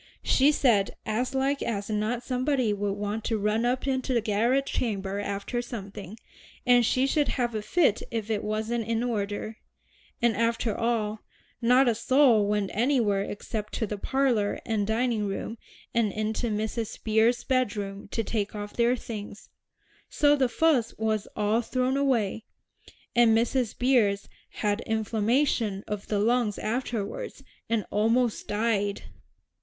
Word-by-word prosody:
She 275 +3 +4
said 230 -9 +2
as 240 +5 -1
like 275 +1 +1
as 205 -3 -2
not 215 +3 -1
somebody 255 -3 0
would 205 -1 -1
want 205 +2 -3
to 225 - 0
run 210 +3 +1
up 250 +2 0
into 260 -1 0
the - - +4
garret 230 +6 +1
chamber 200 -6 -2
after 200 +4 -3
something, 205 -4 -8 0.5
and 245 -1 +5
she 255 +3 +2
should 290 +1 +1
have 240 -3 -1
a 215 - -2
fit 225 - +2
if 225 -1 -3
it 210 -1 -1
wasn't 220 +2 -2
in 230 0 0
order. 215 -1 -3 0.6
And 235 -3 +2
after 230 0 0
all, 220 -2 -1 0.4
not 250 +3 +5
a 235 - +4
soul 235 -2 +4
went 205 -1 0
anywhere 225 -4 +2
except 210 +1 -5
to 225 - -1
the 210 -1 -5
parlor 245 -5 +1
and 215 -4 0
dining 225 -1 0
room, 205 +3 -4 0.3
and 230 -3 +2
into 215 +3 -2
Mrs. 220 +1 -3
Beers's 225 +2 +3
bedroom 205 -6 -1
to 225 +3 -2
take 210 -1 -2
off 205 0 -6
their 240 +1 +2
things; 215 -4 -8 0.6
so 290 0 +4
the 265 -3 +2
fuss 265 -5 +2
was 215 -2 -1
all 210 +2 +1
thrown 255 +2 0
away, 235 -7 0 0.7
and 235 -2 +5
Mrs. 240 0 0
Beers 225 -6 +2 0.2
had 210 +1 -1
inflammation 220 -1 +1
of 210 -1 -4
the 210 - 0
lungs 225 0 +1
afterward, 235 - -3 0.4
and 225 -2 0
almost 225 +2 +1
died." 205 -2 0
225 Hz, 150 wpm, -27 LUFS, 210-245 Hz, 0.7 s, and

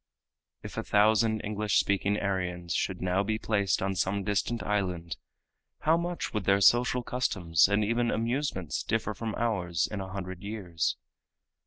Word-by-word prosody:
If - - -8
a - - -1
thousand 110 +1 +3
English 105 0 0
speaking 100 +1 +1
Aryans 90 -3 -2
should 95 -2 -1
now 90 +1 +2
be 110 +2 -1
placed 100 -5 0
on 95 0 0
some 95 +2 -1
distant 105 +2 -1
island, 90 -5 -2 0.7
how 160 +2 +4
much 170 +1 -3
would 105 -4 -2
their 100 0 +4
social 120 +4 +4
customs 95 -11 +2
and 105 +1 +2
even 115 +2 +1
amusements 115 - -1
differ 110 -1 -1
from 110 +1 -4
ours 90 -8 0
in 105 -2 -3
a 95 - -6
hundred 95 -2 -6
years? 95 -6 -2
100 Hz, 155 wpm, -29 LUFS, 95-110 Hz, 0.7 s, how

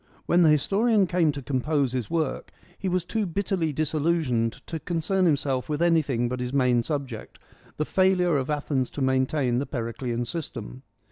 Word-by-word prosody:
When 175 - +3
the 165 - +6
historian 200 - +3
came 175 -3 +2
to 140 -1 -7
compose 140 0 0
his 125 -4 -3
work 160 -4 -2 0.3
he 195 - -3
was 180 -1 0
too 215 +1 -1
bitterly 175 -2 -1
disillusioned 150 -6 0
to 165 - -5
concern 180 +4 0
himself 135 -4 0
with 150 -1 -1
anything 155 -8 +2
but 125 +1 -3
his 125 0 -3
main 125 -3 +3
subject, 135 -4 -5 0.4
the 155 - 0
fail 190 +1 +3
ure 175 -4 +2
of 135 0 -2
Athens 145 -3 -1
to - - -2
maintain 130 -1 +1
the 140 - -3
Periclean 120 0 -3
system. 130 -3 -6
150 Hz, 175 wpm, -26 LUFS, 130-170 Hz, 0.4 s, the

